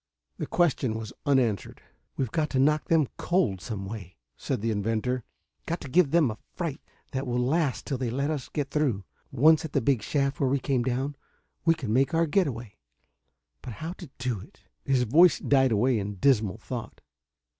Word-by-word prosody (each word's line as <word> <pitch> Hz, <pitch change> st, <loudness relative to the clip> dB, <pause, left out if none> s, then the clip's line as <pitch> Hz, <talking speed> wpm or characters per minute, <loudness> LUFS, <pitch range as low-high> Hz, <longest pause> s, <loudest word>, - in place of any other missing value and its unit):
The -, -, -3 dB
question 135 Hz, -9 st, +1 dB
was 110 Hz, +1 st, -6 dB
unanswered. 120 Hz, -, +1 dB, 0.4 s
"We've 130 Hz, -5 st, -1 dB
got 155 Hz, -2 st, 0 dB
to 130 Hz, -, 0 dB
knock 150 Hz, +3 st, +3 dB
them 160 Hz, -4 st, +3 dB
cold 170 Hz, -, +1 dB
some 100 Hz, -2 st, -5 dB
way," 95 Hz, -3 st, -8 dB, 0.2 s
said -, -, -3 dB
the 115 Hz, +1 st, 0 dB
inventor. 115 Hz, +4 st, -1 dB, 0.4 s
"Got 170 Hz, -, -2 dB
to -, -, -7 dB
give 165 Hz, +3 st, +4 dB
them 155 Hz, -6 st, +3 dB
a 110 Hz, -, -9 dB, 0.2 s
fright 165 Hz, -5 st, -3 dB, 0.3 s
that 135 Hz, 0 st, -3 dB
will 125 Hz, 0 st, -1 dB
last 140 Hz, +3 st, 0 dB
till 135 Hz, -4 st, -3 dB
they 125 Hz, -2 st, -1 dB
let 140 Hz, +5 st, -1 dB
us 140 Hz, -4 st, -4 dB
get 140 Hz, -2 st, -3 dB
through. 130 Hz, -10 st, 0 dB, 0.3 s
Once 155 Hz, +4 st, +5 dB
at 160 Hz, -, -6 dB
the -, -, +3 dB
big 125 Hz, -1 st, +2 dB
shaft 140 Hz, +3 st, -1 dB
where 135 Hz, -, +2 dB
we 140 Hz, -, +2 dB
came 130 Hz, -1 st, 0 dB
down, 130 Hz, +3 st, -1 dB, 0.5 s
we 165 Hz, -1 st, +5 dB
can 125 Hz, -9 st, -3 dB
make 135 Hz, +5 st, +2 dB
our 165 Hz, +1 st, +3 dB
getaway. 130 Hz, -, -1 dB, 0.8 s
But 125 Hz, -, -7 dB
how 160 Hz, -, -5 dB
to 175 Hz, -6 st, -9 dB
do 125 Hz, -4 st, -2 dB
it...." -, -, -15 dB, 0.2 s
His 130 Hz, -2 st, +2 dB
voice 155 Hz, +8 st, +6 dB
died 135 Hz, -2 st, +3 dB
away 115 Hz, +2 st, +2 dB
in 100 Hz, 0 st, -4 dB
dismal 110 Hz, -2 st, +2 dB
thought. 120 Hz, -2 st, -7 dB
130 Hz, 190 wpm, -27 LUFS, 115-150 Hz, 0.8 s, voice